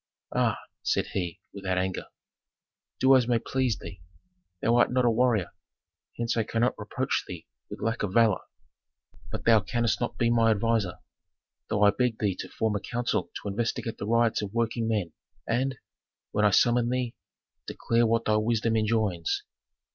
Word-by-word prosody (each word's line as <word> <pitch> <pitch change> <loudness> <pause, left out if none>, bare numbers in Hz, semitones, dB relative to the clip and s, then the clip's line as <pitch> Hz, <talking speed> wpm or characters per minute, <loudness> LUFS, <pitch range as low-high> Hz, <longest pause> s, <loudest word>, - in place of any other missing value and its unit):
"Aa!" - - +2 0.2
said - - 0
he, 90 -3 -3
without 95 -2 -2
anger, 95 0 -2 0.9
"do 135 +1 +6
as 125 -3 +3
may 120 -1 +3
please 130 -1 -1
thee. 95 -4 -10 0.6
Thou 115 +5 +2
art 120 - +4
not 125 0 +2
a 120 - +4
warrior, 115 -5 +2 0.7
hence 115 0 -1
I 115 - +2
cannot 115 +3 +1
reproach - - -1
thee - - -8 0.2
with - - -7
lack 115 +1 -1
of 105 - -1
valor. 110 -2 +3 0.9
But - - -5
thou 115 -2 +6
canst 120 +3 -1
not 120 - -2
be 115 -1 +2
my 115 -1 +4
adviser, 110 -4 +1 0.7
though 105 - +1
I 100 - +7
beg 120 +1 0
thee 100 -3 0
to - - -5
form 110 -2 -1
a - - 0
council 120 +4 -2
to - - -5
investigate 115 +2 -2
the 100 - -4
riots 115 0 +2
of 105 +1 -6
working 115 0 0
men, 100 -8 -1 0.3
and, 130 +2 0 0.5
when 105 0 +2
I - - +6
summon 120 +4 +3
thee, 125 -1 -1 0.5
declare 115 0 +1
what 115 +1 +1
thy 110 0 +3
wisdom 115 +1 +1
enjoins." 110 -6 0
115 Hz, 170 wpm, -27 LUFS, 105-120 Hz, 0.9 s, I